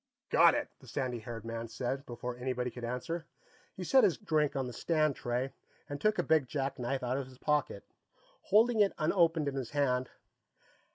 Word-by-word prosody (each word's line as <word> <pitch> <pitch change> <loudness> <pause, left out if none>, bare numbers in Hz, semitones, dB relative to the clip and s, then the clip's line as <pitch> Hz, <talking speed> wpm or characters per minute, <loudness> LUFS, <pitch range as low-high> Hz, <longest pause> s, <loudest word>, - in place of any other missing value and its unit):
"Got - - +7
it!" - - -1
the - - -16
sandy 125 -4 -2
haired 115 0 -7
man 115 0 -4
said, 130 +4 -3
before 120 0 -5
anybody 125 0 -2
could 125 - -9
answer. 145 +8 -3 0.5
He 185 - -5
set 265 +9 +5
his 180 - +4
drink 155 -7 +1
on 135 -1 0
the 125 - -6
stand 155 -2 +1
tray 125 +3 -2 0.3
and 145 0 -6
took 215 +1 +2
a - - +2
big 155 -5 +3
jackknife 135 -2 -2
out 125 +1 0
of 135 - -5
his 130 -1 -15
pocket, 150 +2 0 0.6
holding 220 +3 +4
it 205 -2 +4
unopened 165 -1 +2
in 140 - -1
his 130 -4 -3
hand. 130 -3 +1
135 Hz, 185 wpm, -32 LUFS, 125-160 Hz, 0.6 s, Got